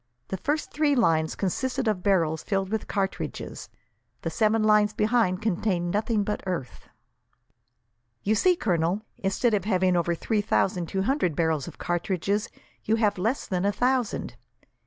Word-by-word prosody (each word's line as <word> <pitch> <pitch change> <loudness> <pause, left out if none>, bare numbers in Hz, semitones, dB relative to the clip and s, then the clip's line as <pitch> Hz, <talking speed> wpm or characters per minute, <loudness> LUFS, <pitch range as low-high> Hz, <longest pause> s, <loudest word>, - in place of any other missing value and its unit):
The 190 - -2
first 295 - -2
three 295 -1 +2
lines 160 -9 +2
consisted 255 +6 -1
of 210 -4 0
barrels 165 -5 +2
filled 195 -2 -1
with 220 -1 -2
cartridges; 195 -1 -3 0.5
the - - -2
seven 220 0 +2
lines 210 -1 +4
behind 215 -3 +1
contained 180 -4 0
nothing 210 +1 +1
but 210 +1 -2
earth. 170 -9 -5 1.3
"You 210 - +2
see, 360 - +4
Colonel, 180 - 0 0.2
instead 200 +4 +1
of 200 -3 +1
having 185 -3 +2
over 170 0 +1
three 215 +5 0
thousand 185 -4 +1
two 190 +2 -1
hundred 215 - +1
barrels 160 -4 0
of - - -9
cartridges, 190 +4 -1 0.3
you 220 - +2
have 210 -4 +1
less 225 +9 0
than 180 -1 -1
a 200 - +3
thousand. 250 +1 -1
200 Hz, 155 wpm, -26 LUFS, 180-220 Hz, 1.3 s, lines